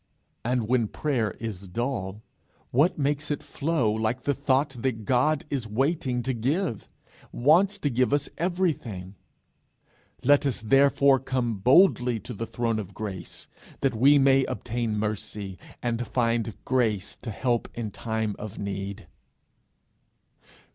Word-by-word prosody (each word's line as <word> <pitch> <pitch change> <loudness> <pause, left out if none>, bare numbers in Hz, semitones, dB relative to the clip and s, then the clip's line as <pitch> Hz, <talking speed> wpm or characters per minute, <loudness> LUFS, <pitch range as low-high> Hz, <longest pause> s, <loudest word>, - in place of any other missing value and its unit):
And 120 -2 0
when 120 -2 +2
prayer 120 -4 -1
is 100 -4 -5
dull, 110 -1 -3 0.5
what 145 +8 +3
makes 145 +1 -1
it 145 - -2
flow 140 -8 0
like 110 +3 -1
the 145 - +1
thought 140 0 +1
that 115 -5 -2
God 135 +6 +2
is 130 -5 -2
waiting 130 +1 0
to 130 - -1
give, 130 - -1 0.4
wants 175 +10 +4
to 145 - -1
give 125 +2 +2
us 145 0 +1
everything! 155 - -1 1.1
'Let 145 +2 +4
us 130 - -1
therefore 135 +2 +5
come 125 -4 -1
boldly 125 - +4
to 120 +4 -7
the 115 +2 -5
throne 115 0 -1
of 100 -2 -7
grace, 100 -4 -7 0.3
that 135 -2 +2
we 135 +6 +5
may 135 -1 +5
obtain 120 -3 -2
mercy, 105 -3 -4 0.2
and 120 -1 -1
find 115 -2 0
grace 110 -6 0
to 120 - -7
help 120 +2 0
in 115 -3 -4
time 110 -1 -2
of 105 0 -7
need.' 100 +1 -5
120 Hz, 135 wpm, -26 LUFS, 110-140 Hz, 1.1 s, therefore